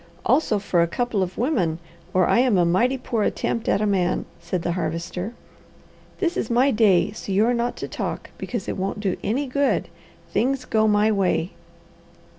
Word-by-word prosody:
"Also 255 -4 +3
for 195 -3 +1
a 170 - +3
couple 230 +3 -1
of 185 0 -3
women 220 - +1 0.3
or 185 -1 +3
I 235 - +3
am 245 -5 +3
a 175 - +4
mighty 235 +10 +2
poor 235 -3 -2
attempt 225 +2 -1
at - - +2
a - - +2
man," 190 -4 +1
said 180 -3 -3
the 175 - 0
Harvester. 180 +5 -3 0.8
"This 350 -3 0
is - - -2
my 250 +4 +3
day, 210 -6 +3
so 205 -1 -7
you 200 +3 +3
are 245 - +2
not 240 0 -1
to - - -5
talk, - - -5
because 230 -6 -4
it - - -3
won't 195 +2 -2
do 195 -3 -1
any 255 +7 0
good. 280 +2 0 0.4
Things 260 +1 +1
go 220 -2 +2
my 210 +1 +3
way." 190 -3 +1
210 Hz, 190 wpm, -23 LUFS, 185-245 Hz, 0.8 s, a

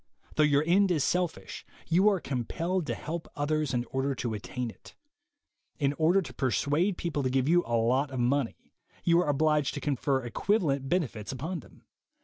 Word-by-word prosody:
Though - - +1
your 145 -1 +4
end 190 +4 +4
is 160 -6 +2
selfish, 180 -2 -2 0.2
you 185 +5 +4
are 195 -3 +1
compelled 165 +6 -2
to 120 - -1
help 165 +6 -5
others 155 +1 0
in 120 -2 -1
order 135 +1 0
to 120 -2 -3
attain 115 +3 -4
it. - - -17 0.8
In 140 -1 +1
order 170 +6 +3
to 130 -5 -9
per 130 +1 0
suade 150 - +1
people 160 -4 -2
to 130 - 0
give 130 +1 +1
you 175 +2 +4
a 120 -1 +1
lot 130 +5 +2
of 130 -2 -4
money, 125 0 -1 0.3
you 170 0 +4
are 175 - +1
obliged 150 0 +2
to - - -3
confer 140 -2 0
equivalent 140 - 0
benefits 125 - -1
upon 160 +7 -4
them. - - -17
145 Hz, 185 wpm, -29 LUFS, 130-170 Hz, 0.8 s, your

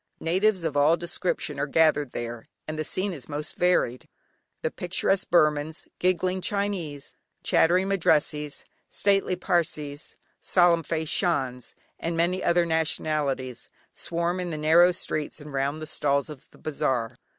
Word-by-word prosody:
Natives 185 +3 +1
of 160 -3 -2
all 150 +4 +4
descriptions 175 -4 -2
are 145 - 0
gathered 150 -2 +3
there, 120 -1 -6 0.2
and 155 0 -4
the - - 0
scene 185 +5 -1
is 140 -5 -9
most 150 +1 -4
varied. 175 -9 +1 0.6
The - - 0
picturesque 185 +2 0
Burmans, 155 -1 +2
giggling 185 +1 +1
Chinese, 185 -9 -2 0.3
chattering 180 +3 +3
Madrassees, 150 -6 +1 0.3
stately 195 -2 +1
Parsees, 155 -5 -2 0.2
solemn 175 -2 +3
faced 160 0 -2
Shans, 130 -9 -1 0.2
and 165 0 -2
many 180 +3 +1
other 170 0 +3
nationalities, 150 -6 -1 0.2
swarm 170 +2 -2
in 180 -1 -3
the 155 - -4
narrow 165 +4 +5
streets 155 -4 -3
and 150 -1 -10
round 140 +3 -1
the 155 - -5
stalls 145 -1 0
of 150 - -12
the - - -20
bazaar. 130 -6 -2
160 Hz, 140 wpm, -26 LUFS, 145-175 Hz, 0.6 s, narrow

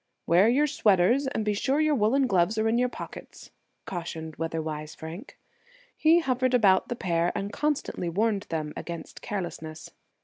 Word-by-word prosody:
"Wear 185 +6 +5
your 280 +5 +3
sweaters, 235 -1 +3
and 220 -5 -2
be 210 - +1
sure 265 +8 0
your 310 -1 +3
woolen 260 +3 +3
gloves 195 -1 +2
are 220 0 +2
in 230 +2 +2
your 250 0 +2
pockets," - - -10 0.3
cautioned 160 -3 -6
weather 165 +1 -2
wise 155 -1 -5
Frank. 165 +7 -9 0.6
He 330 +2 +4
hovered 255 -3 +1
about 195 -5 +4
the 240 - -3
pair, 170 -4 0
and 205 0 -3
constantly 290 - -1
warned 205 +3 0
them 155 -2 -3
against 170 -2 -7
carelessness. 160 -5 -6
205 Hz, 165 wpm, -27 LUFS, 170-250 Hz, 0.6 s, Wear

